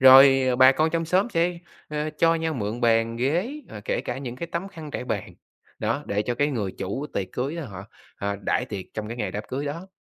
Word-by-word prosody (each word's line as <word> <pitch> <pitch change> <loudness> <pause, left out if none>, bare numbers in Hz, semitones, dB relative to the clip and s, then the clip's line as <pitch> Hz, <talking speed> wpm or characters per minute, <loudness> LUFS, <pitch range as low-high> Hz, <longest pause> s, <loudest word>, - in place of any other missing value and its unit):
rồi, 135 0 +9
à, 125 - +2
bà 130 +1 +8
con 155 +3 +2
trong 165 0 0
xóm 185 +7 +2
sẽ, 170 -1 +1 0.3
ơ, 150 0 -2
cho 165 0 +5
nhau 160 -1 -1
mượn 110 0 -3
bàn, 115 -1 +3
ghế, 160 - +1 0.2
ờ, - - -8
kể - - 0
cả - - -4
những 125 -3 -5
cái 170 - -4
tấm 170 +3 -3
khăn 160 -6 -9
trải 125 - -4
bàn, - - -3 0.4
đó, - - 0
để 100 +1 0
cho 120 +3 -1
cái 145 +4 +2
người 105 -9 -2
chủ 130 +10 -3
tiệc 95 - -1
cưới 140 +6 -2
á 165 - -4
họ, 95 -2 -8 0.3
à, 100 0 -2
đãi 125 - +1
tiệc 100 -6 -5
trong 110 -1 -4
cái 115 - -5
ngày 110 - -2
đám 105 - -4
cưới 135 +3 -2
đó. 165 +6 -4
135 Hz, 245 wpm, -25 LUFS, 115-165 Hz, 0.4 s, rồi